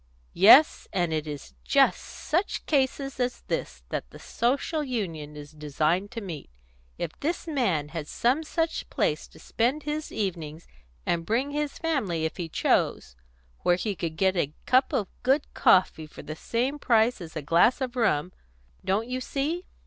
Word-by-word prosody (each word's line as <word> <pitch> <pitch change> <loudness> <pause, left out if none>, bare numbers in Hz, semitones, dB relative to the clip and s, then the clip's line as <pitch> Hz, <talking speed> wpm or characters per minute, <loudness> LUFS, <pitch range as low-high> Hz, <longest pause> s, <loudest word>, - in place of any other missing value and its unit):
"Yes; 225 - +7
and 175 -4 0
it 155 0 -2
is 145 - -7
just - - +3
such 350 +7 -2
cases 275 -1 0
as 245 0 -1
this - - -4
that - - -4
the - - -12
Social 280 +6 -1
Union 170 - -4
is 145 0 -10
designed 155 +5 -1
to 230 0 -6
meet. 170 -8 -7 0.5
If - - -3
this 330 +4 -2
man 200 - 0
had 155 -2 -5
some 250 - +1
such 325 +1 -2
place - - 0
to - - -18
spend 255 +6 -1
his 300 +1 -3
evenings 165 -6 -4 0.4
and 170 -1 0
bring 245 +10 0
his 295 0 -2
family 215 - -1
if 160 - -3
he 170 -3 -4
chose 110 - 0 0.4
where 175 - +3
he 200 +3 -2
could 165 -2 -4
get 190 +1 +2
a 150 -4 -1
cup 255 +1 +3
of 205 - 0
good 270 +4 +2
coffee 170 -4 +3
for - - -11
the 155 - -6
same 250 - -2
price 230 -4 +3
as 165 -2 -9
a 155 - -4
glass 170 - +4
of 260 -2 -3
rum 185 -8 +1 0.5
Don't 210 +4 0
you 255 +1 -3
see?" 310 +8 -2
210 Hz, 170 wpm, -27 LUFS, 165-270 Hz, 0.5 s, Yes